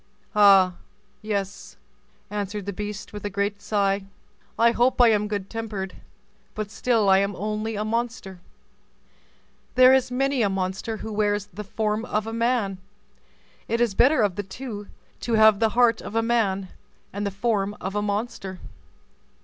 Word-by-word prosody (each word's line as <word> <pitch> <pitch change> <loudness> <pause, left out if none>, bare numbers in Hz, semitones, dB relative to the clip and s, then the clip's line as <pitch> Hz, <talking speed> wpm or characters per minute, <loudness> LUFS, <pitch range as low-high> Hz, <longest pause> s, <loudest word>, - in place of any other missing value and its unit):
"Ah! 195 -3 +6 0.4
yes," 200 -2 -4 0.5
answered 205 -1 -4
the 200 - -4
beast, 210 +1 -6
with 205 - -7
a 205 - -2
great 200 +1 -2
sigh; 200 -2 0 0.5
"I 235 0 +5
hope 245 +2 +2
I 240 -2 +7
am 210 -1 +2
good 205 -2 -3
tempered, 210 -4 -5 0.6
but 215 -1 -4
still 225 -1 +1
I 190 0 +6
am 200 0 -1
only 215 +3 -3
a 210 +1 -2
monster." 225 -4 -3 1.4
"There 255 +1 +8
is 265 -2 +3
many 270 +1 0
a 205 - +3
monster 190 +3 -3
who 220 - -5
wears 205 -1 0
the 210 +4 -6
form 215 +1 -2
of 215 -3 -1
a 225 - -5
man; 230 -5 0 0.9
it 230 - 0
is 235 -4 +2
better 255 +3 +4
of 200 -3 0
the - - 0
two 205 +1 -7 0.3
to 235 - -3
have 220 -2 +6
the 225 - +3
heart 235 -2 +4
of 215 - -8
a 225 - +2
man 200 -5 0 0.4
and 200 +1 -3
the 200 - 0
form 205 0 -1
of 190 - -4
a 210 - 0
monster." 205 -2 -3
210 Hz, 165 wpm, -24 LUFS, 200-225 Hz, 1.4 s, There